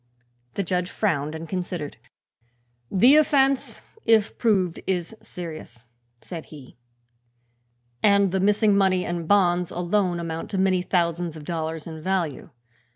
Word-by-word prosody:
The 200 - 0
judge 180 0 -1
frowned 155 -7 -1
and 160 +1 -7
considered. 175 -4 -4 0.9
"The 245 +10 +6
offense, 275 -3 +2 0.2
if 220 -2 +3
proved, 190 -7 +1
is 185 +2 -2
serious," 155 -8 -9 0.4
said 165 -3 -8
he, 145 -5 -13 1.3
"and 200 -2 +4
the 190 - 0
missing 205 +1 +3
money 190 -2 +2
and 170 -2 -3
bonds 180 -3 +3
alone 180 0 0
amount 165 -1 -5
to 200 - -3
many 190 -1 +2
thousands 170 -2 -1
of 150 - -10
dollars 160 -1 -4
in 160 -1 -8
value. 175 -5 -2
180 Hz, 130 wpm, -24 LUFS, 165-200 Hz, 1.3 s, The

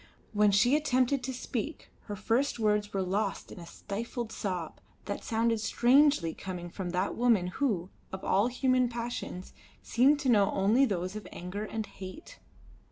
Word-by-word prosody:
When 210 0 +4
she 220 +7 +4
attempted 275 -3 +2
to 260 - -3
speak 255 +3 -5
her 205 - -5
first 230 +8 0
words 210 -2 +1
were 195 -1 -1
lost 195 +2 -2
in - - -9
a 170 - -10
stifled 230 +4 -5
sob 180 -7 -4 0.2
that - - -4
sounded 230 -1 +1
strangely 245 - +3
coming 175 -2 -7
from 185 -1 -4
that 180 +2 -1
woman 230 -6 +3 0.2
who, 195 -10 0 0.2
of 190 - -6
all 200 +4 +3
human 255 0 +2
passions, 235 -6 -5 0.3
seemed 275 +5 +4
to 270 - 0
know 205 -4 +5
only 215 +8 +4
those 185 -3 -2
of 215 - -7
anger 190 +4 -5
and 220 0 -4
hate. 205 - -10
215 Hz, 165 wpm, -30 LUFS, 195-250 Hz, 0.3 s, know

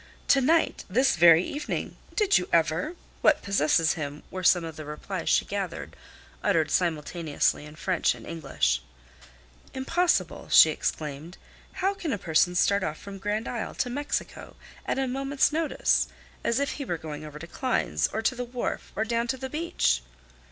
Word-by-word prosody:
"To 275 - +6
night!" 320 +5 +2
"This 260 +7 +3
very 170 0 +7
evening!" 295 +7 -4 0.2
"Did 420 -3 +4
you 180 - -6
ever!" 165 - +1 0.3
"What - - +4
possesses 165 -4 +2
him!" 150 -2 -6
were 185 0 -5
some 175 0 +5
of 165 -1 -6
the 155 - -7
replies 150 0 -5
she - - +3
gathered, - - -5 0.5
uttered 160 -2 +1
simultaneously 160 -3 0
in 150 - -12
French 180 +2 +1
and - - -12
English. 135 - -1 0.9
"Impossible!" 340 +7 0
she - - +8
exclaimed. 155 +3 -4 0.5
"How 390 - +3
can 345 -6 -4
a 205 - 0
person 175 -1 +2
start 200 +2 +3
off 155 -2 -3
from 200 -1 -9
Grand 210 +3 -2
Isle 235 -3 -4
to 250 - -1
Mexico 290 +4 -4 0.3
at - - 0
a 270 -1 0
moment's 275 +3 +1
notice, 320 0 +1 0.4
as 235 +2 +1
if 280 - 0
he 285 - -5
were 175 -7 -2
going 155 -1 -7
over 150 -1 -9
to 155 - -8
Klein's 75 - 0
or 220 - -4
to 255 - +2
the 250 0 -4
wharf 245 0 -4
or 220 - 0
down 235 +1 0
to 260 - -1
the 265 0 -6
beach?" 300 - +1
190 Hz, 175 wpm, -27 LUFS, 155-265 Hz, 0.9 s, she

